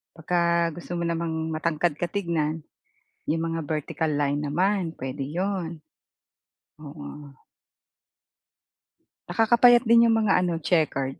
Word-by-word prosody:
Baka 170 Hz, +2 st, -1 dB, 0.4 s
gusto 175 Hz, 0 st, -10 dB
mo 170 Hz, -, -2 dB
namang 165 Hz, -1 st, -2 dB, 0.2 s
matangkad 155 Hz, 0 st, 0 dB
ka 175 Hz, -, +1 dB
tignan, 165 Hz, -5 st, -1 dB, 0.8 s
yung 165 Hz, +1 st, 0 dB
mga 165 Hz, -, -2 dB
vertical 155 Hz, +1 st, -2 dB
line 145 Hz, 0 st, 0 dB
naman, 180 Hz, +2 st, 0 dB
puwede 135 Hz, +2 st, -5 dB
'yon. 180 Hz, +2 st, -2 dB, 1.1 s
Oo. 145 Hz, -1 st, -10 dB, 2.0 s
Nakakapayat 235 Hz, +1 st, +5 dB
din 235 Hz, 0 st, +5 dB
yung 225 Hz, -, +3 dB
mga 195 Hz, -3 st, +3 dB
ano 175 Hz, -2 st, 0 dB
checkered. 150 Hz, -5 st, 0 dB
165 Hz, 115 wpm, -25 LUFS, 150-190 Hz, 2.0 s, Nakakapayat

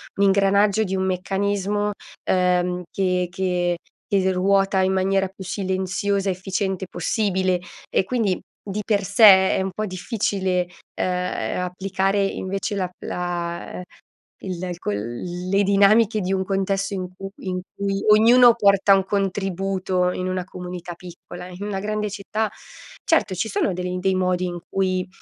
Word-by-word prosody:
un 200 Hz, -, +1 dB
ingranaggio 200 Hz, +2 st, +3 dB
di 190 Hz, -2 st, -2 dB
un 190 Hz, -, 0 dB
meccanismo, 200 Hz, +2 st, -1 dB, 0.3 s
ehm, 180 Hz, -1 st, +1 dB
che 180 Hz, -2 st, 0 dB
che 180 Hz, -1 st, 0 dB, 0.3 s
che 190 Hz, -2 st, +2 dB
ruota 195 Hz, +1 st, +2 dB
in 190 Hz, 0 st, +2 dB
maniera 195 Hz, 0 st, +1 dB
più 190 Hz, 0 st, -11 dB
silenziosa, 190 Hz, +1 st, -1 dB
efficiente 190 Hz, +1 st, -2 dB
possibile 185 Hz, 0 st, 0 dB, 0.3 s
e -, -, +2 dB
quindi 215 Hz, -6 st, 0 dB, 0.2 s
di 210 Hz, +1 st, -4 dB
per 205 Hz, -3 st, +1 dB
sé 195 Hz, +4 st, +1 dB, 0.3 s
è -, -, +1 dB
un 190 Hz, 0 st, -2 dB
po' 215 Hz, -, -2 dB
difficile 185 Hz, -2 st, -1 dB, 0.3 s
e, -, -, -2 dB
applicare 185 Hz, +2 st, -1 dB
invece 195 Hz, +2 st, -2 dB
la 185 Hz, -2 st, -1 dB
la 175 Hz, 0 st, -4 dB, 0.6 s
il 185 Hz, -3 st, -5 dB, 0.2 s
c -, -, -13 dB
le 175 Hz, -, -2 dB
dinamiche 205 Hz, +2 st, +4 dB
di 185 Hz, +1 st, -2 dB
un 190 Hz, -1 st, 0 dB
contesto 195 Hz, +1 st, -1 dB
in 185 Hz, -2 st, -3 dB
cui 195 Hz, 0 st, -7 dB, 0.2 s
in 185 Hz, 0 st, -2 dB, 0.2 s
cui 195 Hz, 0 st, -2 dB
ognuno 240 Hz, +3 st, +7 dB
porta 200 Hz, -3 st, +4 dB
un 195 Hz, -, +2 dB
contributo 190 Hz, -2 st, -1 dB
in 185 Hz, 0 st, -3 dB
una 185 Hz, -1 st, -2 dB
comunità 180 Hz, -1 st, -7 dB
piccola. 175 Hz, 0 st, -10 dB
In 185 Hz, +2 st, -8 dB
una 195 Hz, -2 st, -3 dB
grande 210 Hz, +1 st, -2 dB
città, 215 Hz, +2 st, -2 dB, 0.5 s
certo 325 Hz, -, +2 dB
ci 220 Hz, +5 st, -2 dB
sono 190 Hz, -1 st, 0 dB
del 180 Hz, 0 st, -3 dB
dei 190 Hz, +1 st, +1 dB
modi 185 Hz, 0 st, +1 dB
in 175 Hz, -1 st, -4 dB
cui 185 Hz, -1 st, 0 dB
190 Hz, 145 wpm, -23 LUFS, 180-200 Hz, 0.6 s, ognuno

